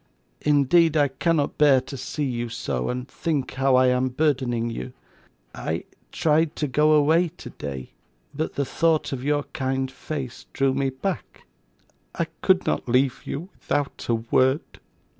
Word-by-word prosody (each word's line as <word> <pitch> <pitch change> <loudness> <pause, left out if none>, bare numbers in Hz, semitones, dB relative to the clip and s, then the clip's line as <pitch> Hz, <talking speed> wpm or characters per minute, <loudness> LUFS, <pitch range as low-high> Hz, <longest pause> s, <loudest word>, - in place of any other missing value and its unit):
Indeed 150 +3 +4
I 145 -1 +4
cannot 145 +2 0
bear 145 -3 +6
to 135 +2 -8
see 150 +3 -4
you 120 -3 -2
so, 65 - -3
and 125 +1 -3
think 150 -3 -2
how 135 0 +3
I 130 0 +5
am 125 +1 +2
burdening 125 -4 0
you. 125 +2 -6 0.6
I - - -3 0.3
tried 155 0 +2
to 150 - -1
go 150 +4 +3
away 160 +4 +4
today, 70 -3 -7 0.4
but 155 +3 -3
the 140 - 0
thought 160 0 +1
of 130 -1 -4
your 145 0 +1
kind 130 0 -1
face 135 -4 -6
drew 135 -1 +2
me 135 0 0
back. 150 +8 -5 0.7
I - - 0 0.2
could - - +3
not 75 +10 -1
leave 130 +1 +2
you 165 +7 -5
without 145 -1 -2
a 115 - +4
word. 130 +5 +1
135 Hz, 155 wpm, -24 LUFS, 125-150 Hz, 0.7 s, bear